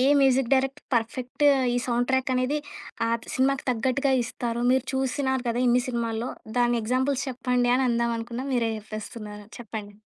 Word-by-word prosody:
ఏ - - +4 0.2
music 265 -2 +3
director 270 +2 -1
perfect 245 +4 -1 0.3
ఈ - - +1
sound 245 0 0
track 260 0 +1
అనేది 255 +4 +1 0.5
ఆ - - 0 0.3
సినిమాకి 270 +1 +1
తగ్గట్టుగా 260 +3 +1
ఇస్తారు. 235 0 -3
మీరు 260 0 +3
చూసినారు 265 -1 0
కదా! 235 - 0
ఇన్ని 245 +1 +4
సినిమాల్లో 235 -1 -2 0.3
దాన్ని 240 -1 +3
ఎగ్జాంపుల్స్ 260 +4 0
చెప్పండి 250 -1 +1
అనందామనుకున్నా, 235 -1 0
మీరే 230 -2 +1
జెప్పేస్తున్నారు. 215 0 -8
చెప్పండి. 215 -3 -7
245 Hz, 145 wpm, -26 LUFS, 235-260 Hz, 0.5 s, ఏ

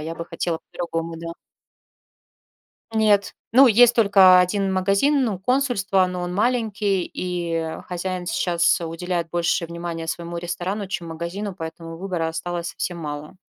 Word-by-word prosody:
я 160 +2 -5
бы 170 - -6
хотела 165 -2 -2
по-другому, 165 -1 -5
да. 165 0 -6 1.6
Нет. 210 -2 +2 0.2
Ну, 260 +3 +8
есть 240 +2 +6
только 195 -4 +7
1 195 +2 +1
магазин, 200 +10 +2
ну, 200 -6 -2
консульство, 200 -6 +1
но 180 0 -4
он 175 0 -3
маленький 210 -4 0
и, 175 -2 -4
э, 160 -1 -3
хозяин 180 0 -4
щас 170 -1 +2
уделяет 170 +1 -3
больше 170 0 0
внимания 170 -1 -5
своему 170 +1 -4
ресторану, 185 +4 -3
чем 170 -2 -4
магазину, 175 +5 -5
поэтому 165 -1 -7
выбора 175 -3 -2
осталось 170 +1 -4
совсем 175 -1 -4
мало, 150 0 -6
180 Hz, 140 wpm, -23 LUFS, 170-200 Hz, 1.6 s, Ну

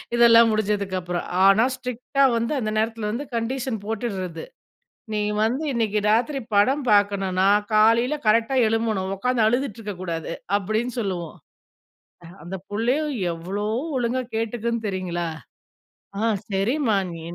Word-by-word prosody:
இதெல்லாம் 230 -1 +7
முடிஞ்சதுக்கு 205 -3 -1
அப்புறம். 175 0 -3 0.2
ஆனா 195 +4 +6
ஸ்ட்ரிக்ட்டா 255 +2 -1
வந்து 235 +6 -1
அந்த 215 -3 -2
நேரத்துல 225 -1 -1
வந்து 265 +6 -4
கண்டிஷன் 240 +1 -2
போட்டுர்றது. 195 -7 -4 0.7
நீ 210 - 0 0.2
வந்து 250 +8 0
இன்னைக்கி 220 -3 0
ராத்திரி 245 +6 +2 0.2
படம் 265 +8 +3
பார்க்கணுன்னா, 195 -2 +2 0.3
காலைல 230 +6 +4
கரெக்ட்டா 230 +4 +3
எழும்பணும். 220 -4 -1
உட்கார்ந்து 245 +2 +1
அழுதுட்டு 245 +1 0
இருக்க 210 -2 -5
கூடாது, 165 -3 -4 0.3
அப்டின்னு 220 +5 -2
சொல்லுவோம். 180 -6 -3 1.1
அந்த 175 +3 -6
புள்ளையும் 255 +8 0 0.2
எவ்ளோ 190 +5 -4 0.3
ஒழுங்கா 245 +1 0
கேட்டுக்குன் 230 0 -2
தெரியுங்களா? 180 -3 -3 0.9
ஆ 215 - 0 0.2
சரிம்மா 220 +5 +1 0.2
நீ 165 - -8
220 Hz, 120 wpm, -23 LUFS, 195-240 Hz, 1.1 s, இதெல்லாம்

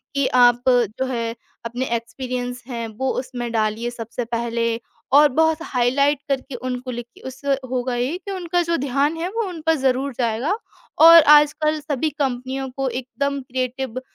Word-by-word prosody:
कि 275 -1 +2
आप 245 -1 +5
जो 245 0 +1
है 235 -3 -3 0.3
अपने 245 +3 -3
एक्सपीरियंस 245 +1 -5
हैं, 235 -3 -4
वो 260 +5 -3
उसमें 245 -2 -5
डालिए 220 +1 0
सबसे 235 0 -5
पहले 230 0 -1 0.3
और 295 +1 +8
बहुत 320 +3 +2
हाइलाइट 280 +1 +1
करके 270 -1 -2
उनको 255 0 -4
लिखिए। 240 0 -9
उससे 270 +2 -2 0.2
होगा 250 -1 -1
ये 255 +8 -1
कि 395 +1 -8
उनका 355 -2 -1
जो 335 0 0
ध्यान 280 +4 0
है, 335 - -2
वो 455 0 -2
उन 350 -3 -7
पर 325 - +5
ज़रूर 265 0 0
जाएगा 245 - 0 0.4
और 330 0 +10
आजकल 300 +1 +5
सभी 295 0 -1
कंपनियों 265 0 -2
को 270 -1 0
एकदम 280 +3 -3
क्रिएटिव 255 0 -4
255 Hz, 160 wpm, -21 LUFS, 240-285 Hz, 0.4 s, और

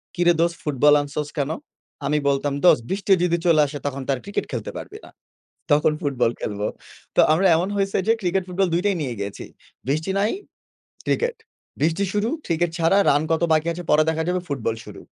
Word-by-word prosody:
"কিরে 175 -1 +4
দোস্ত 170 0 +1
ফুটবল 145 0 +4
আনছস 145 +1 -4
কেন?" 140 -1 0 0.6
আমি 150 +2 +1
বলতাম 140 +1 0
"দোস্ত 125 -9 +6
বৃষ্টি 195 +1 -2
যদি 170 -1 +2
চলে 165 -3 +5
আসে 145 +1 -6
তখন 140 -1 -3
তো - - -10
আর - - -8
ক্রিকেট 200 +1 -3
খেলতে - - -4
পারবি 420 - -8
না। - - -14 0.6
তখন 150 +1 +4
ফুটবল 135 -5 +1
খেলব।" 105 -1 -4 0.6
তো - - +7
আমরা 180 +5 +3
এমন 175 +3 0
হয়েছে 195 -1 0
যে 225 - +5
ক্রিকেট-ফুটবল 185 0 0
২ 175 - +1
টাই 200 -2 +2
নিয়ে 130 -4 -3
গিয়েছি। 100 0 -5 0.4
"বৃষ্টি 155 +7 -1
নাই 205 +3 +2 0.8
ক্রিকেট, 480 0 0 0.4
বৃষ্টি 165 +5 +1
শুরু 210 +2 0 0.2
ক্রিকেট 170 +1 0
ছাড়া 165 +3 +3
রান 145 +1 +3
কত 160 - +1
বাকি 155 +1 +1
আছে 175 +1 -7
পরে 155 +1 +5
দেখা 160 0 -1
যাবে 180 0 0
ফুটবল 115 -6 -2
শুরু।" - - -10
160 Hz, 190 wpm, -23 LUFS, 145-180 Hz, 0.8 s, তো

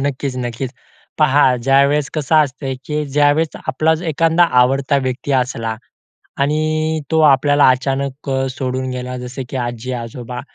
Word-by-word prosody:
नक्कीच, 140 -1 -2
नक्कीच. 120 +1 -4 0.5
पहा 145 -2 +4
ज्यावेळेस 140 +3 +2
कसं 155 +1 -1
असतं 135 -2 +1
की 150 0 -2
ज्यावेळेस 145 +3 +2 0.2
आपलाच 160 +5 +1
एखादा 165 +3 +3 0.2
आवडता 135 +3 +2
व्यक्ती 130 +2 -3
असला 115 -4 -1 0.6
आणि 155 +2 0
तो 160 - +3
आपल्याला 145 +1 +4
अचानक 135 +2 -1
अ, 135 0 0
सोडून 130 0 -3
गेला 125 0 -5
जसं 125 +2 -6
की 135 - -5
आजी-आजोबा 120 0 -5
135 Hz, 130 wpm, -18 LUFS, 125-150 Hz, 0.6 s, पहा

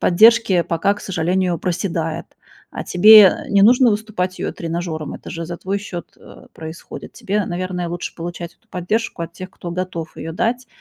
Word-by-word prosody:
поддержки 210 -1 +5
пока, 185 +5 0
к 205 - -12
сожалению, 180 -1 0
проседает. 170 -3 -2 0.5
А - - -3
тебе, 215 +4 +8
э, - - -4
не 200 -1 +4
нужно 245 +2 +6
уступать 205 -4 -2
её - - -2
тренажёром. 165 -2 -4
Это - - -10
же 165 -1 -5
за 175 0 -5
твой 195 +3 -3
счёт, 175 -4 -7
э, - - -15
происходит. 160 +1 -9
Тебе, 205 +1 -2
наверное, 180 0 -3
лучше 175 +1 -5
получать 170 0 -6
эту - - -39
поддержку 185 0 -2
от 165 0 -6
тех, 185 +2 -8
кто 175 -2 -8
готов 170 -2 -4
её 165 - -6
дать. 235 +6 -1
180 Hz, 180 wpm, -20 LUFS, 170-200 Hz, 0.5 s, тебе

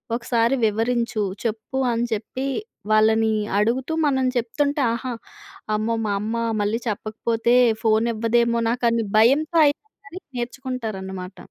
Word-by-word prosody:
ఒకసారి 235 +1 +1
వివరించు. 225 +1 0 0.2
చెప్పు 225 +3 -3
అని 235 0 0
చెప్పి 240 +5 -4 0.4
వాళ్ళని 220 +1 +4 0.3
అడుగుతూ 250 +8 0
మనం 265 -2 +1
చెప్తుంటే 285 +5 0
ఆహా! 245 +2 -4 0.6
అమ్మో! 220 +2 0
మా 205 - 0
అమ్మ 220 +2 -3 0.3
మళ్ళీ 210 +3 0
చెప్పకపోతే 225 +2 0 0.3
ఫోనివ్వదేమో 230 +1 +2
నాకని 235 -1 +1
భయంతో 285 +9 +4
ఐనా 290 - -2 0.3
గాని 335 +6 -9 0.2
నేర్చుకుంటారన్నమాట. 220 -7 -5
230 Hz, 110 wpm, -23 LUFS, 220-250 Hz, 0.6 s, వాళ్ళని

